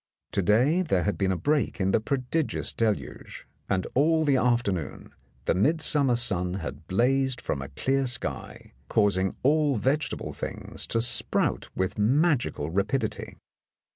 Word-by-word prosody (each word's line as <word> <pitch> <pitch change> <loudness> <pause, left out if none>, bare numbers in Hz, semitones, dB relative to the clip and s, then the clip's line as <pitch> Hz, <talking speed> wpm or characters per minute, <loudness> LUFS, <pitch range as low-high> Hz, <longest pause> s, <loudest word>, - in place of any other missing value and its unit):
To - - +1
day 125 - +3
there 95 - +1
had 100 - 0
been 95 -1 0
a 95 - 0
break 145 - 0
in 95 0 +1
the - - +3
prodigious 140 +5 -1
deluge, 110 -3 -3 0.2
and 95 -2 0
all 160 +4 +3
the 140 -2 +3
afternoon 120 - -1 0.3
the - - +2
midsummer 140 - +2
sun 90 -6 -1
had 85 -2 -7
blazed 130 +5 +1
from 70 - -3
a 70 - -7
clear 135 - 0
sky, 90 - -3 0.2
causing 95 -3 +2
all 145 0 +3
vegetable 135 +8 -1
things - - -6
to 115 - 0
sprout 120 - +1
with 95 +2 -2
magical 120 - +1
rapidity. 100 +9 -2
120 Hz, 140 wpm, -26 LUFS, 95-140 Hz, 0.3 s, day